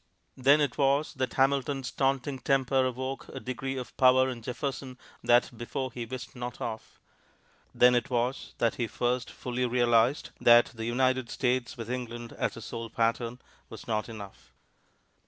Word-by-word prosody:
Then 140 +3 +5
it 140 -4 -1
was 140 +2 +2
that 130 -3 -2
Hamilton's 135 -1 +1
taunting 135 0 0
temper 135 0 +2
awoke 130 +2 -5
a 135 - -7
degree 135 +1 -4
of 125 -3 -7
power 130 0 +5
in 120 -2 -6
Jefferson 130 +1 -4 0.3
that 120 0 +3
before 130 +3 -4
he 120 -1 -6
wist 130 +2 -7
not 125 -1 -6
of; 110 -1 -6 0.8
then 125 0 +6
it 120 -1 +1
was 125 +1 -2
that 115 - +2
he 120 - -1
first 125 +2 -1
fully 125 0 -2
realized 120 +2 +2
that 120 0 +6
the 115 -1 -5
"United 130 +1 +1
States" 125 -2 -1
with 115 0 -5
England 120 -2 -5
as - - -2
a - - -8
sole 115 0 -6
pattern 115 +2 -1 0.3
was - - -10
not 110 0 -1
enough. 105 -3 -11
125 Hz, 160 wpm, -29 LUFS, 120-130 Hz, 0.8 s, then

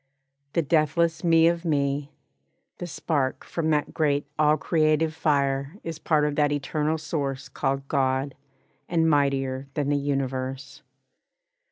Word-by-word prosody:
The 170 - +2
deathless 160 +3 +1
Me 165 -1 +5
of 170 0 0
me, 140 -2 0 0.7
The 175 - -4
spark 145 -4 -1
from 160 -2 -2
that 150 -1 0
great 145 -2 +1
all 155 0 +4
creative 155 0 +1
fire 140 -1 0
Is 165 -1 -5
part 155 -2 +2
of 150 -1 -1
that 145 -1 +3
eternal 150 +2 -1
source 140 -4 -3
called 135 0 -2
God, 135 0 0 0.6
And 165 -2 +2
mightier 135 -3 +1
than 145 -2 0
the 145 - +2
universe. 135 -1 -3
145 Hz, 135 wpm, -25 LUFS, 140-160 Hz, 0.7 s, Me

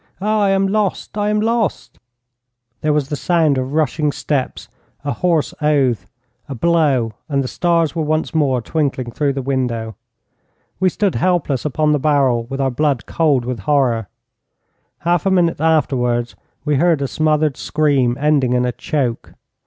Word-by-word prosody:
Ah, 215 +2 0
I 200 - +3
am 195 0 +2
lost! 205 -1 -1
I 205 0 0
am 210 0 +1
lost!' 225 0 -1 0.8
There 155 - +1
was 150 -2 0
the 150 - -2
sound 155 -4 +2
of 130 +2 -4
rushing 150 -1 +1
steps, 140 -2 -3 0.4
a 145 - 0
hoarse 170 -4 0
oath, 140 -6 +1 0.4
a 135 - -4
blow, 140 -6 +1 0.2
and 140 -2 +1
the - - -3
stars 170 +1 0
were 165 - -1
once 155 +1 -1
more 135 -6 +1
twinkling 135 -6 -2
through 140 +3 0
the 135 -1 -4
window. 120 -5 -2 0.8
We 185 - +3
stood 200 +1 0
helpless 175 -8 0
upon 150 +1 +1
the 150 - +2
barrel 135 -5 +2
with 135 +3 -6
our 135 -1 +1
blood 140 -1 0
cold 145 -7 +1
with 125 -2 -3
horror. 120 -2 +1 0.9
Half 175 +2 +1
a - - +4
minute 175 -5 +2
afterwards 125 -7 +1 0.3
we 150 -2 +1
heard 165 -2 +2
a - - -1
smothered 155 -1 +1
scream, 140 -6 +1
ending 140 -4 +2
in 125 0 +2
a 125 - 0
choke. 125 -2 -3
150 Hz, 165 wpm, -18 LUFS, 130-165 Hz, 0.9 s, a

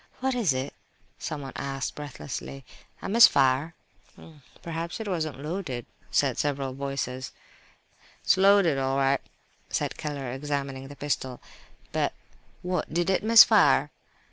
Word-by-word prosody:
"What 265 +1 0
is 230 - +2
it?" 130 +1 -3 0.5
someone 145 -3 -5
asked, 135 -1 -3
breathlessly—"A 140 -2 -8
misfire?" 155 - +5 0.9
"Perhaps 165 +2 -4
it 220 - -5
wasn't 155 -7 -2
loaded," 150 - -4 0.2
said - - +1
several 135 -2 -1
voices. 130 -1 -4 0.9
"It's - - +4
loaded 190 -6 +4
all 135 0 0
right," 135 0 +2 0.5
said - - -2
Keller, 140 -4 -4
examining 135 -1 -4
the 140 - -10
pistol, 130 -3 -3 0.5
"but—" - - 0 0.5
"What! 180 0 -2
did 175 +3 +1
it 190 - +1
miss 225 +1 +10
fire?" - - +4
145 Hz, 120 wpm, -27 LUFS, 135-170 Hz, 0.9 s, miss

